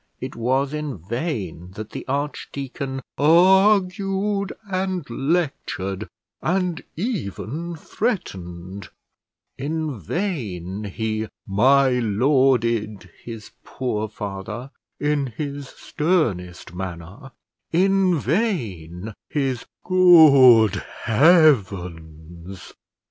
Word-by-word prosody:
It 130 Hz, +1 st, -6 dB
was 130 Hz, +4 st, 0 dB
in 150 Hz, -5 st, -4 dB
vain 95 Hz, -, -4 dB
that 110 Hz, 0 st, -7 dB
the -, -, -7 dB
archdeacon 140 Hz, -1 st, -4 dB, 0.2 s
argued 195 Hz, +4 st, +3 dB, 0.2 s
and 185 Hz, -4 st, -2 dB
lectured, 120 Hz, -, -2 dB, 0.3 s
and 180 Hz, -1 st, -1 dB
even 170 Hz, -, -4 dB
threatened; 95 Hz, -, -4 dB, 0.7 s
in 150 Hz, -2 st, -3 dB
vain 105 Hz, -, -4 dB
he 110 Hz, +2 st, -3 dB, 0.2 s
my 130 Hz, +5 st, +4 dB
lorded 115 Hz, -, +1 dB
his 115 Hz, -3 st, -9 dB
poor 110 Hz, -4 st, -3 dB
father 105 Hz, +5 st, -6 dB, 0.3 s
in 145 Hz, -2 st, 0 dB
his 140 Hz, +3 st, -5 dB
sternest 115 Hz, -, -2 dB
manner; 95 Hz, -, -7 dB, 0.4 s
in 190 Hz, 0 st, +3 dB
vain 110 Hz, -, -2 dB, 0.2 s
his 135 Hz, -5 st, -2 dB, 0.2 s
"good 140 Hz, -, +7 dB, 0.3 s
heavens!" 95 Hz, -, +1 dB
130 Hz, 80 wpm, -22 LUFS, 100-160 Hz, 0.7 s, good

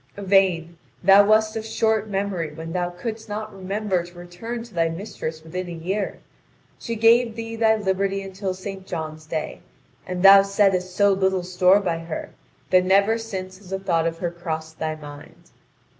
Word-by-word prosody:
Yvain, 185 Hz, -4 st, +2 dB, 0.2 s
thou 195 Hz, +2 st, +8 dB
wast 215 Hz, +1 st, +3 dB
of 220 Hz, -, -3 dB
short 220 Hz, -1 st, 0 dB
memory 195 Hz, -5 st, -2 dB
when 165 Hz, +1 st, -7 dB
thou 180 Hz, -1 st, -1 dB
couldst 220 Hz, +5 st, -6 dB
not 215 Hz, +1 st, -5 dB
remember 195 Hz, 0 st, -1 dB
to 175 Hz, 0 st, -14 dB
return 200 Hz, +7 st, -6 dB
to 235 Hz, -2 st, -15 dB
thy 165 Hz, -1 st, +1 dB
mistress 165 Hz, -3 st, -6 dB
within 180 Hz, +3 st, -5 dB
a -, -, -7 dB
year. 190 Hz, +5 st, -3 dB, 0.6 s
She 230 Hz, -, -4 dB
gave 230 Hz, +1 st, +4 dB
thee 230 Hz, 0 st, -5 dB
thy 220 Hz, -1 st, +3 dB
liberty 195 Hz, -1 st, -1 dB
until 190 Hz, 0 st, -4 dB
St. 190 Hz, 0 st, -8 dB
John's 155 Hz, -2 st, -6 dB
day, 155 Hz, -1 st, -4 dB, 0.5 s
and 180 Hz, 0 st, -3 dB
thou 195 Hz, 0 st, +10 dB
settest 195 Hz, -2 st, +1 dB
so 200 Hz, -1 st, +4 dB
little 190 Hz, -1 st, +1 dB
store 180 Hz, +2 st, +4 dB
by 175 Hz, -5 st, -2 dB
her 165 Hz, -1 st, -6 dB, 0.4 s
that 185 Hz, 0 st, +5 dB
never 200 Hz, +4 st, +3 dB
since 190 Hz, -4 st, -6 dB
has 195 Hz, -2 st, -15 dB
a 190 Hz, -, -1 dB
thought 170 Hz, -4 st, 0 dB
of 165 Hz, 0 st, -3 dB
her 170 Hz, 0 st, -3 dB
crossed 160 Hz, -2 st, -6 dB
thy 155 Hz, 0 st, -2 dB
mind. 145 Hz, -1 st, -13 dB
190 Hz, 175 wpm, -23 LUFS, 175-205 Hz, 0.6 s, thou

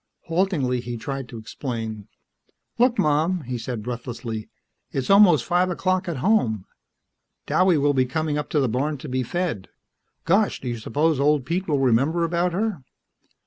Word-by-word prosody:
Haltingly, 165 Hz, -8 st, 0 dB
he 120 Hz, 0 st, -5 dB
tried 135 Hz, +3 st, -5 dB
to 115 Hz, -, -8 dB
explain. 110 Hz, -2 st, -5 dB, 0.7 s
"Look, 245 Hz, 0 st, +4 dB
Mom," 160 Hz, +4 st, +2 dB
he 125 Hz, -3 st, -5 dB
said 115 Hz, -2 st, -5 dB
breathlessly. 120 Hz, -2 st, -5 dB, 0.4 s
"It's 135 Hz, +6 st, -1 dB
almost 185 Hz, -, +6 dB
five 180 Hz, +1 st, +2 dB
o'clock 185 Hz, 0 st, 0 dB
at 165 Hz, -, -3 dB
home. 110 Hz, -, +2 dB, 0.8 s
Douwie 185 Hz, -3 st, +3 dB
will 145 Hz, +1 st, +3 dB
be 130 Hz, -1 st, +2 dB
coming 155 Hz, +3 st, -1 dB
up 150 Hz, -, -3 dB
to 150 Hz, -, +1 dB
the 135 Hz, -, +2 dB
barn 140 Hz, +6 st, -1 dB
to 145 Hz, -, -9 dB
be 130 Hz, -1 st, -1 dB
fed. 150 Hz, -, -3 dB, 0.6 s
Gosh, 195 Hz, +5 st, +2 dB
do 130 Hz, -, -7 dB
you 120 Hz, -1 st, -3 dB
suppose 150 Hz, +6 st, +1 dB
old 145 Hz, -2 st, +2 dB
Pete 180 Hz, +6 st, -2 dB
will 150 Hz, -3 st, +1 dB
remember 135 Hz, +6 st, +2 dB
about 170 Hz, +2 st, +1 dB
her?" 200 Hz, -3 st, -2 dB
145 Hz, 165 wpm, -24 LUFS, 125-175 Hz, 0.8 s, almost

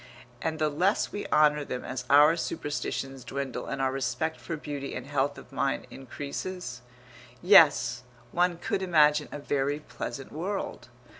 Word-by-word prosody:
And 160 Hz, -1 st, -2 dB
the 155 Hz, -1 st, +1 dB
less 180 Hz, +8 st, +1 dB
we 205 Hz, -, -5 dB
honour 150 Hz, -1 st, +4 dB
them 125 Hz, -3 st, -5 dB
as 130 Hz, 0 st, -5 dB
our 150 Hz, +3 st, +7 dB
superstitions 135 Hz, -4 st, -3 dB
dwindle 140 Hz, -2 st, -4 dB
and 140 Hz, -, -4 dB
our 135 Hz, -1 st, +1 dB
respect 135 Hz, +4 st, -2 dB
for 165 Hz, -, -4 dB
beauty 145 Hz, -2 st, -5 dB
and 130 Hz, -, -5 dB
health 140 Hz, 0 st, 0 dB
of -, -, -13 dB
mind 135 Hz, -, -1 dB
increases.... 140 Hz, +1 st, -6 dB, 0.6 s
Yes, 145 Hz, -, +6 dB, 0.3 s
one 175 Hz, -1 st, +2 dB
could 180 Hz, -, -2 dB
imagine 150 Hz, -5 st, +4 dB
a -, -, -5 dB
very 145 Hz, 0 st, -1 dB
pleasant 135 Hz, -3 st, -7 dB
world. 190 Hz, +6 st, -4 dB
145 Hz, 150 wpm, -28 LUFS, 135-160 Hz, 0.6 s, our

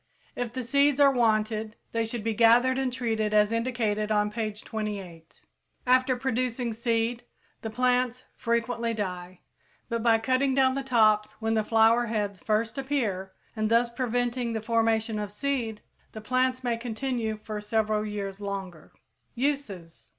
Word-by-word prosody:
If 245 Hz, -2 st, -3 dB
the 255 Hz, +1 st, -4 dB
seeds 280 Hz, +3 st, +3 dB
are 280 Hz, -1 st, +7 dB
wanted, 220 Hz, -2 st, +1 dB, 0.2 s
they 230 Hz, 0 st, 0 dB
should 225 Hz, -1 st, -5 dB
be 225 Hz, 0 st, 0 dB
gathered 240 Hz, +4 st, +4 dB
and 265 Hz, -1 st, 0 dB
treated 220 Hz, -4 st, -1 dB
as 210 Hz, 0 st, +4 dB
indicated 230 Hz, -3 st, -1 dB
on 210 Hz, 0 st, +2 dB
page 215 Hz, -1 st, -4 dB
28. 195 Hz, -7 st, -6 dB, 0.4 s
After 255 Hz, +1 st, +4 dB
producing 250 Hz, -2 st, -1 dB
seed, 230 Hz, +1 st, -1 dB, 0.4 s
the 220 Hz, -, -4 dB
plants 250 Hz, +1 st, +1 dB
frequently 235 Hz, 0 st, -1 dB
die; 180 Hz, -3 st, -5 dB, 0.5 s
but 230 Hz, -1 st, -1 dB
by 225 Hz, -1 st, +4 dB
cutting 255 Hz, +4 st, +1 dB
down 260 Hz, -1 st, +4 dB
the 275 Hz, -, -2 dB
tops 215 Hz, -5 st, +3 dB
when 225 Hz, 0 st, -2 dB
the 220 Hz, -1 st, +2 dB
flower 225 Hz, +2 st, +4 dB
heads 205 Hz, -4 st, -2 dB
first 220 Hz, +6 st, -1 dB
appear, 215 Hz, -9 st, -2 dB, 0.2 s
and 215 Hz, -1 st, 0 dB
thus 235 Hz, +1 st, +3 dB
preventing 245 Hz, 0 st, -1 dB
the 220 Hz, -, -1 dB
formation 225 Hz, -1 st, +1 dB
of 210 Hz, -1 st, -3 dB
seed, 230 Hz, -2 st, -2 dB, 0.3 s
the 220 Hz, -, -7 dB
plants 255 Hz, +3 st, 0 dB
may 240 Hz, -2 st, 0 dB
continue 230 Hz, -1 st, -3 dB
for 210 Hz, -1 st, -5 dB
several 215 Hz, 0 st, 0 dB
years 200 Hz, -2 st, -5 dB
longer. 190 Hz, -5 st, -6 dB, 0.4 s
_Uses. 235 Hz, -, -3 dB
230 Hz, 150 wpm, -27 LUFS, 215-250 Hz, 0.5 s, are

